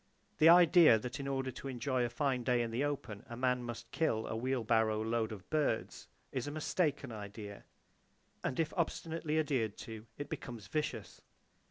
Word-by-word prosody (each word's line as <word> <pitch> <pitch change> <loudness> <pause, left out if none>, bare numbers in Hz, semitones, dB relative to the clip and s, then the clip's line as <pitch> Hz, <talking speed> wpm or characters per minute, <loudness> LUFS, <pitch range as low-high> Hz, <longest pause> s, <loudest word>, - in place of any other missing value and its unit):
The 160 - +8
idea 170 -6 +8
that 125 +4 -5
in 140 - -4
order 135 -1 -1
to 135 - -8
enjoy 130 0 -1
a 120 - 0
fine 130 +1 0
day 125 -1 +2
in 115 - -4
the 120 +5 0
open 130 -8 -3
a 120 - -6
man 125 0 +1
must 120 -1 -7
kill 115 -9 0
a - - -3
wheel 125 +1 -1
barrow 110 -1 +2
load 115 0 0
of 100 -3 -9
birds, 150 -7 -1 0.2
is 130 +1 -3
a - - -3
mistaken 150 -3 -1
idea; 105 -1 -8 0.8
and 130 - -2
if 160 -1 0
obstinately 165 -2 -1
adhered 130 -9 0
to, 110 0 -8
it 145 - -5
becomes 115 -5 -6
vicious! 150 +9 -3
125 Hz, 180 wpm, -34 LUFS, 115-145 Hz, 0.8 s, The